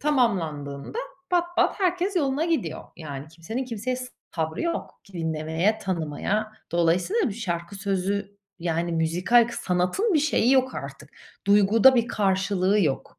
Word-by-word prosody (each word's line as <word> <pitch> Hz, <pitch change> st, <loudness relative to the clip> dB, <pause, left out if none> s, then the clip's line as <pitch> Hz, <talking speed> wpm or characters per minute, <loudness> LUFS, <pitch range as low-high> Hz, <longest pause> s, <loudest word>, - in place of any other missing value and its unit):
tamamlandığında 175 Hz, -, 0 dB, 0.3 s
pat 350 Hz, 0 st, 0 dB
pat -, -, +2 dB
herkes 365 Hz, +1 st, +1 dB
yoluna 285 Hz, -1 st, +1 dB
gidiyor. 320 Hz, -, -1 dB
Yani, 145 Hz, -3 st, -7 dB
kimsenin 170 Hz, +11 st, -5 dB
kimseye 250 Hz, +1 st, -3 dB
s 255 Hz, 0 st, -5 dB, 0.3 s
sabrı 160 Hz, -1 st, -2 dB
yok. 340 Hz, 0 st, -3 dB
Ki, 200 Hz, -, -19 dB
dinlemeye, 160 Hz, +5 st, 0 dB
tanımaya. 195 Hz, +4 st, -2 dB, 0.2 s
Dolayısıyla, 180 Hz, -, +2 dB
şarkı 180 Hz, -3 st, -4 dB
sözü, 200 Hz, +1 st, -2 dB, 0.2 s
yani 170 Hz, 0 st, -1 dB
müzikal 180 Hz, +9 st, +3 dB
k -, -, -7 dB
sanatın 185 Hz, -, +1 dB
bir -, -, +5 dB
şeyi 270 Hz, -4 st, +3 dB
yok 260 Hz, -1 st, +3 dB
artık. -, -, -8 dB, 0.4 s
Duyguda 210 Hz, +5 st, +6 dB
bir 240 Hz, -1 st, +2 dB
karşılığı 195 Hz, -1 st, +2 dB
yok. 145 Hz, -7 st, -1 dB
200 Hz, 135 wpm, -25 LUFS, 170-255 Hz, 0.4 s, Duyguda